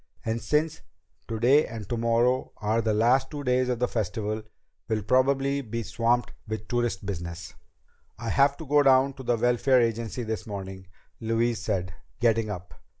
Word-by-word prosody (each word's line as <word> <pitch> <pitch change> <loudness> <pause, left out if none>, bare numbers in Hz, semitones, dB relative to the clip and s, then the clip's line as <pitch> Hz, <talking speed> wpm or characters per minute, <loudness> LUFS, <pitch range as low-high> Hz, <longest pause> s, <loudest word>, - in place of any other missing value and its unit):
"And 115 +1 -1
since 155 +1 0 0.5
today 120 +7 +3
and 110 -3 -7
tomorrow 120 +3 +1
are 110 +2 0
the 110 -1 0
last 125 +5 +3
two 145 -2 -6
days 125 -1 +2
of 125 - 0
the 125 +1 +1
Festival, 110 -1 -2 0.5
we'll 110 -2 0
probably 135 +4 +2
be 115 -2 -4
swamped 120 +2 0
with 110 -1 -5
tourist 120 -5 -1
business." 85 -3 -5 0.6
"I 115 +1 -4
have 140 +2 +3
to 160 - -8
go 145 +1 +4
down 135 0 +4
to 135 - -10
the 120 -2 +1
Welfare 125 +2 +3
Agency 115 +1 -1
this 110 -1 -4
morning," 95 -2 -7 0.3
Louise 115 +1 0
said, 90 -4 -2 0.3
getting 115 -2 +2
up. 90 -3 -7
115 Hz, 160 wpm, -27 LUFS, 110-130 Hz, 0.6 s, go